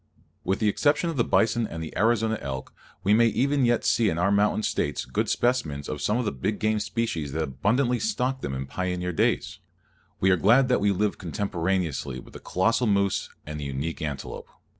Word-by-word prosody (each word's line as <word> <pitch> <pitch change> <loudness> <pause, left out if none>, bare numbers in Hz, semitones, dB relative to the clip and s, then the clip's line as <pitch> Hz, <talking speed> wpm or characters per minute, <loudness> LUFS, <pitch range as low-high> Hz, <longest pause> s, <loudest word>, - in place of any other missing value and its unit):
With 95 +1 0
the 110 - +1
exception 155 - +2
of 155 - -6
the 120 - +3
bison 115 0 +2
and 80 -3 -6
the 80 - -8
Arizona 110 +1 +2
elk, 65 -1 -5 0.3
we 100 - +4
may 115 +2 +5
even 135 +3 +2
yet 120 -1 +1
see 115 -3 +3
in 80 - -2
our 90 +3 +2
mountain 105 +1 +2
States - - -1
good 65 - -1
specimens 80 - 0
of 75 -2 -4
some 105 +8 +1
of 125 - -1
the - - 0
big 70 +10 -2
game 110 0 +1
species 100 - -2
that 80 +1 0
abundantly 120 - +1
stocked 135 - -1
them 65 - -3
in 65 0 -3
pioneer 90 +4 -2
days. - - 0 0.6
We 95 - +3
are 90 - +4
glad 120 +8 +4
that 125 - +2
we 100 0 +3
live 100 +2 0
contemporaneously 90 - -2
with - - -14
the - - -9
colossal 115 +6 +1
moose 100 -1 +1 0.2
and 75 0 -6
the 75 - -5
unique 70 +5 -4
antelope. 70 -4 -5
100 Hz, 205 wpm, -26 LUFS, 80-115 Hz, 0.6 s, may